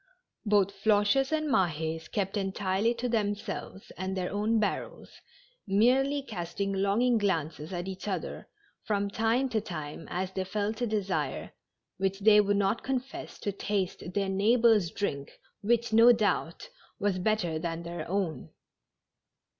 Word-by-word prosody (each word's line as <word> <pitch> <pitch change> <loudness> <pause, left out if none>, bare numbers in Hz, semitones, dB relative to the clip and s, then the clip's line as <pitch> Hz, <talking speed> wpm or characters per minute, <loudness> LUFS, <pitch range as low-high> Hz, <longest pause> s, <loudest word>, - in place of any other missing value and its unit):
Both 200 -2 +4
Floches 215 +6 +3
and 310 -1 0
Mahds 160 - 0
kept 195 0 -1
entirely 195 +3 0
to 240 +1 -2
themselves 205 -3 -3
and 190 +1 -3
their 180 -1 -2
own 215 +3 +1
barrels, 210 - -3 0.5
merely 260 +8 +3
casting 195 -2 -3
longing 215 +5 +2
glances 160 -5 -1
at 175 0 -4
each 190 +1 -6
other, 190 -3 -4 0.3
from 200 -1 -1
time 225 +5 +1
to 220 -3 0
time, 155 -5 -7
as 185 +1 -2
they 190 0 -2
felt 210 +4 -2
a 240 - +1
desire, 205 -3 -2 0.5
which 195 +1 -1
they 210 0 +7
would 205 0 +1
not 200 +3 +1
confess, 265 0 -4
to 205 - -1
taste 195 -3 -3
their 200 -1 +1
neighbors' 210 0 +4
drink, 140 -8 -4 0.2
which, 235 +1 +1
no 230 +2 +8
doubt, 200 -7 0 0.3
was 200 -2 0
bet 215 +3 +1
ter 165 -3 -2
than 165 0 -4
their 170 0 -6
own. 185 -4 -2
200 Hz, 145 wpm, -29 LUFS, 185-220 Hz, 0.5 s, no